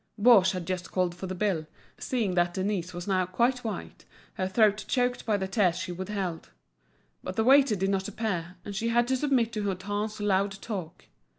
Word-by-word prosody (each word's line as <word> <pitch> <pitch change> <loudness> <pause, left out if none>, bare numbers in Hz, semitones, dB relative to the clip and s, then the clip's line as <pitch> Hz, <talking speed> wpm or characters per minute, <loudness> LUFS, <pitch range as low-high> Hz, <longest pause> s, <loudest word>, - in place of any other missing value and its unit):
Baugé 205 -4 +6
had 180 -2 -4
just 185 0 -4
called 180 -2 0
for 190 +2 -7
the 185 - -4
bill, 180 -5 -1 0.3
seeing 235 -9 -1
that 175 -1 +1
Denise 190 -2 -1
was 175 +1 -7
now 185 -2 +1
quite 240 +7 +1
white, 220 -2 -6 0.3
her 185 -3 -2
throat 210 +1 +3
choked 245 -2 0
by 210 -2 +2
the 190 -1 -2
tears 190 -3 +2
she 185 0 -4
withheld; 190 -1 -4 0.7
but - - -5
the 220 - +2
waiter 265 -2 +5
did 195 0 0
not 190 -1 -1
appear, 185 -5 -3
and 205 - -6
she 225 +4 -1
had 240 +1 +3
to 260 - +3
submit 255 -4 +1
to 215 - -2
Hutin's 205 +2 -3
loud 200 -1 +1
talk. 185 -8 -6
200 Hz, 195 wpm, -28 LUFS, 185-220 Hz, 0.7 s, Baugé